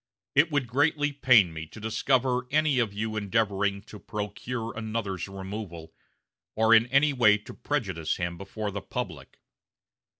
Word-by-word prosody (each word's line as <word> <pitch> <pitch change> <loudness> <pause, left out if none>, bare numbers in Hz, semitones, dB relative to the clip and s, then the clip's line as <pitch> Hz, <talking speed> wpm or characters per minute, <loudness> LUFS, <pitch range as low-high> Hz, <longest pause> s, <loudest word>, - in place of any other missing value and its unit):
It 150 +4 +4
would 145 -4 0
greatly 145 +4 +1
pain 120 - +5
me 80 0 -6
to 110 - -12
discover 125 +3 +1
any 150 -2 +2
of 115 -4 +1
you 110 +2 -3
endeavoring 100 -1 0
to 105 0 -12
procure 110 +3 -5
another's 110 -4 -3
removal, 95 -4 -7 0.6
or 110 +1 +4
in 115 +1 +6
any 140 +3 +3
way 105 -5 +5
to 105 - -12
prejudice 95 - -2
him 85 -1 -3
before 100 +3 -5
the 100 0 -5
public. - - -6
110 Hz, 145 wpm, -27 LUFS, 100-125 Hz, 0.6 s, in